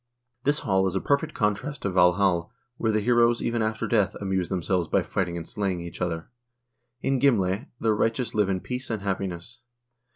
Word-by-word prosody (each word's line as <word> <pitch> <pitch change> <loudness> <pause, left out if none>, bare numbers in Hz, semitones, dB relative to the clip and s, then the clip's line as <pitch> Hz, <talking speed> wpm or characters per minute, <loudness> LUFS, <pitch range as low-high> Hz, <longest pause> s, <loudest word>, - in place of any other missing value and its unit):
This 145 +2 +2
hall 95 -1 +2
is 95 - -2
a - - +2
perfect 145 +6 0
contrast 105 +7 -1
to 100 - 0
Valhal, 90 -1 +3 0.3
where 110 - +1
the 110 0 +1
heroes 120 +1 +4
even 120 -1 -1
after 110 0 -1
death 105 -5 +2
amuse 95 -3 -1
themselves 90 -2 0
by - - +2
fighting 90 -3 -2
and 85 - -6
slaying 95 -3 -2
each 85 0 -8
other; 85 -2 -2 0.7
in 135 -1 +1
Gimle 110 -4 +2
the 110 -1 +2
righteous 115 +2 0
live 105 -3 +2
in 95 -2 -1
peace 125 +1 -5
and 110 -4 -3
happiness. 95 +3 -4
100 Hz, 185 wpm, -26 LUFS, 90-115 Hz, 0.7 s, heroes